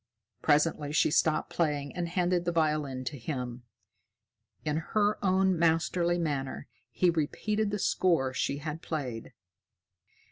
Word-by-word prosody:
Presently 150 -1 +2
she 155 - +3
stopped 155 +1 +2
playing 145 -4 -1
and 175 -1 -2
handed 180 0 +1
the 175 - 0
violin 150 -5 0
to 135 +2 -5
him. 125 -1 -4 1.0
In 150 0 0
her 205 +6 0
own 190 -2 +3
masterly 170 +1 +2
manner, 145 -6 -2 0.2
he 175 +8 +2
repeated 210 +7 -1
the 205 - -1
score 165 -9 +1
she 140 +1 -1
had 155 +2 -5
played. 130 -10 -5
160 Hz, 130 wpm, -29 LUFS, 145-175 Hz, 1.0 s, she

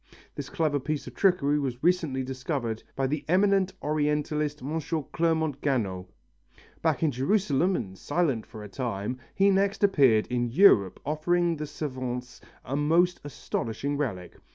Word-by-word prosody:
This - - -6
clever 155 -3 0
piece 150 +2 -3
of - - -9
trickery 150 -7 +2
was 130 -2 -4
recently 165 -7 +1
discovered 130 -3 -3
by 135 - 0
the 145 +2 -2
eminent 190 +1 +3
Orientalist 150 0 0
M. 155 +4 -2 0.3
Clermont 160 -4 0
Ganneau. 100 -10 -1 0.7
Back - - +1
in 155 - +3
Jerusalem 175 - +1
and 95 - -4
silent 145 - -1
for 110 - -10
a - - -7
time, 115 +1 -4 0.2
he 200 0 +4
next 195 +1 +1
appeared 135 - +4
in 120 -1 -1
Europe 115 - +5
offering 170 +3 +1
the 150 0 -4
savants 130 -4 -5 0.2
a 130 - -3
most 165 +5 +2
astonishing 140 -1 -3
relic. 105 -12 -3
145 Hz, 145 wpm, -27 LUFS, 125-165 Hz, 0.7 s, Europe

